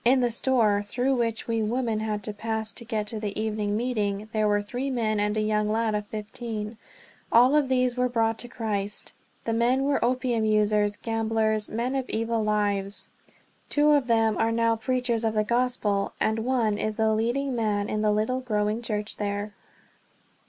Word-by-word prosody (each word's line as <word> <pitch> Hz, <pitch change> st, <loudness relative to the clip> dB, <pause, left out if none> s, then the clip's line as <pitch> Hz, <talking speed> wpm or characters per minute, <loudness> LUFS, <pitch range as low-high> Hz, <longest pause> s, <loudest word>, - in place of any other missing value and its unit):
In 255 Hz, +2 st, +5 dB
the 245 Hz, -1 st, +2 dB
store, 225 Hz, -4 st, +2 dB
through 245 Hz, +6 st, 0 dB
which 230 Hz, -2 st, -1 dB
we 230 Hz, -1 st, 0 dB
women 225 Hz, 0 st, 0 dB
had 215 Hz, -1 st, -2 dB
to 210 Hz, -, -4 dB
pass 220 Hz, +1 st, -3 dB
to 235 Hz, -, -7 dB
get 220 Hz, -2 st, -2 dB
to 215 Hz, +1 st, -5 dB
the 210 Hz, -1 st, -3 dB
evening 215 Hz, -1 st, -1 dB
meeting, 215 Hz, -4 st, -1 dB
there 215 Hz, -1 st, +2 dB
were 205 Hz, 0 st, +3 dB
three 250 Hz, +6 st, -3 dB
men 220 Hz, -5 st, 0 dB
and 210 Hz, +1 st, 0 dB
a -, -, +2 dB
young 210 Hz, 0 st, +1 dB
lad 220 Hz, 0 st, +1 dB
of 210 Hz, 0 st, -2 dB
fifteen; 215 Hz, 0 st, -5 dB, 0.5 s
all 250 Hz, +5 st, +6 dB
of 290 Hz, -3 st, +3 dB
these 255 Hz, -1 st, +2 dB
were 250 Hz, 0 st, +1 dB
brought 225 Hz, -2 st, +1 dB
to 245 Hz, -, -4 dB
Christ. 210 Hz, -3 st, -3 dB, 0.3 s
The 225 Hz, -, 0 dB
men 245 Hz, +4 st, +2 dB
were 280 Hz, 0 st, +1 dB
opium 245 Hz, -2 st, +1 dB
users, 210 Hz, -1 st, +2 dB
gamblers, 220 Hz, -1 st, 0 dB
men 235 Hz, +4 st, -2 dB
of 265 Hz, -2 st, -2 dB
evil 225 Hz, 0 st, 0 dB
lives. 205 Hz, -2 st, 0 dB, 0.6 s
Two 300 Hz, 0 st, +4 dB
of 285 Hz, -4 st, +3 dB
them 225 Hz, -2 st, +2 dB
are 225 Hz, 0 st, +2 dB
now 230 Hz, 0 st, +2 dB
preachers 240 Hz, 0 st, -1 dB
of 220 Hz, -1 st, 0 dB
the 215 Hz, -, +3 dB
Gospel, 235 Hz, -3 st, 0 dB
and 220 Hz, +1 st, +1 dB
one 225 Hz, -3 st, +1 dB
is 215 Hz, 0 st, -1 dB
the 220 Hz, 0 st, +2 dB
leading 245 Hz, +5 st, 0 dB
man 210 Hz, -3 st, 0 dB
in 215 Hz, -, -1 dB
the 215 Hz, -1 st, +3 dB
little 220 Hz, +5 st, 0 dB
growing 215 Hz, -2 st, -1 dB
church 210 Hz, -2 st, -3 dB
there. 205 Hz, 0 st, -3 dB
220 Hz, 190 wpm, -26 LUFS, 210-240 Hz, 0.6 s, all